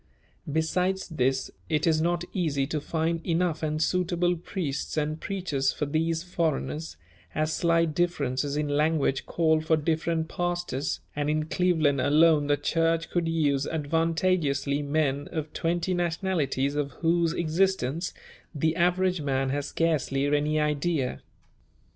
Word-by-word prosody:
Besides 180 +5 0
this, 135 -4 0 0.2
it 150 - +1
is 160 -2 +3
not 175 +1 0
easy 150 -8 0
to 150 +1 -3
find 165 +2 -1
enough 170 -1 0
and 155 -1 -1
suitable 175 +1 +1
priests 160 -5 -4
and 155 +1 -1
preachers 165 -9 -1
for 150 - -3
these 160 +2 0
foreigners, 165 -2 -2 0.4
as 155 0 0
slight 165 -2 +2
differences 145 -5 0
in 150 0 0
language 145 -1 +1
call 160 -2 +2
for 160 0 +2
different 160 +1 0
pastors, 175 -6 -2
and 145 0 -1
in 155 0 +1
Cleveland 160 -5 +2
alone 150 +1 +4
the 145 0 +3
Church 165 +2 0
could 175 -2 0
use 145 -4 +1
advantageously 160 -2 0
men 145 -1 0
of 155 -2 -4
twenty 175 +2 0
nationalities 165 -6 0
of 145 -2 -2
whose 165 0 +2
existence 170 -2 0 0.4
the 160 +2 +1
average 180 0 +2
man 135 -2 0
has 145 +1 -2
scarcely 145 -5 0
any 145 +1 +1
idea. 150 -2 0
160 Hz, 135 wpm, -27 LUFS, 145-170 Hz, 0.4 s, alone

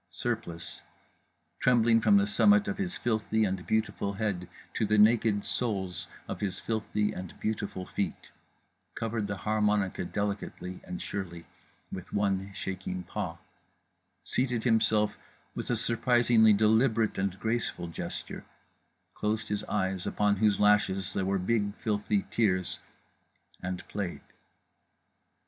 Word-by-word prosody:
Surplice, 85 0 -4 0.8
trembling 115 -2 +4
from 105 -2 +6
the 100 - +4
summit 205 - +4
of 205 -2 -3
his 190 -2 -1
filthy 110 -1 +1
and 95 -2 -3
beautiful 110 -2 0
head 100 -4 -2 0.3
to - - 0
the 105 0 +3
naked 105 -1 +4
soles 95 -7 -2 0.2
of - - -4
his 95 -3 -2
filthy 105 -2 -1
and 90 -1 -8
beautiful 100 -4 -3
feet, 100 - -4 0.6
covered 110 -2 -2
the 105 -1 -3
harmonica 105 -2 +1
delicately 100 -1 -4
and 90 - -5
surely 85 -4 -5 0.5
with 95 -1 -7
one 100 -1 0
shaking 95 -1 -4
paw; - - -4 0.9
seated 125 -3 0
himself 110 -3 +2 0.3
with - - -5
a 120 - +2
surprisingly 115 -1 +4
deliberate 110 +1 +3
and 95 -1 -1
graceful 115 -5 -1
gesture; 85 - -6 0.7
closed 110 +1 -2
his 105 -1 -1
eyes, 95 -2 -1
upon 105 -1 +2
whose 105 0 +3
lashes 105 -2 +3
there 95 - 0
were 95 +1 +1
big 100 +1 0
filthy 105 -2 0
tears… 95 -5 +1 0.8
and 95 -1 -4
played…. 100 -4 -4
105 Hz, 125 wpm, -29 LUFS, 95-110 Hz, 0.9 s, from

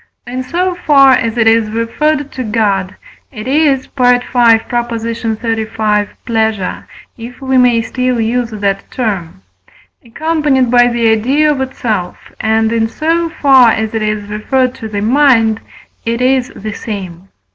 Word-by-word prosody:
In 250 +1 -4
so 355 +8 -1
far 285 -6 +4
as 230 -2 0
it 230 - +2
is 225 -1 +3
referred 285 +7 -1
to 260 - -6
God, 205 -4 -1 0.4
it 215 -3 -8
is 280 -1 +2
(V. - - -26
xxxv.) 230 -3 0 0.2
pleasure, 220 -4 -2 0.3
if 240 +2 -9
we 265 -1 -1
may 245 -2 +3
still 250 +1 -1
use 230 +1 -1
that 200 -3 -3
term, 190 - -4 0.6
accompanied 280 0 0
by 245 0 +5
the 235 -1 0
idea 260 +8 +2
of 275 -3 -2
itself, 220 -8 -3 0.2
and, 220 0 +1
in 225 -1 +1
so 330 +6 -1
far 270 -6 +5
as 220 0 -1
it 225 - -2
is 215 -1 -2
referred 250 +5 -1
to 225 -4 -8
the 205 -2 -4
mind, 225 -2 +3 0.4
it 230 +1 -2
is 255 0 +1
the 215 +1 -6
same 200 -5 -6
(V. - - -19
230 Hz, 145 wpm, -14 LUFS, 220-260 Hz, 0.6 s, by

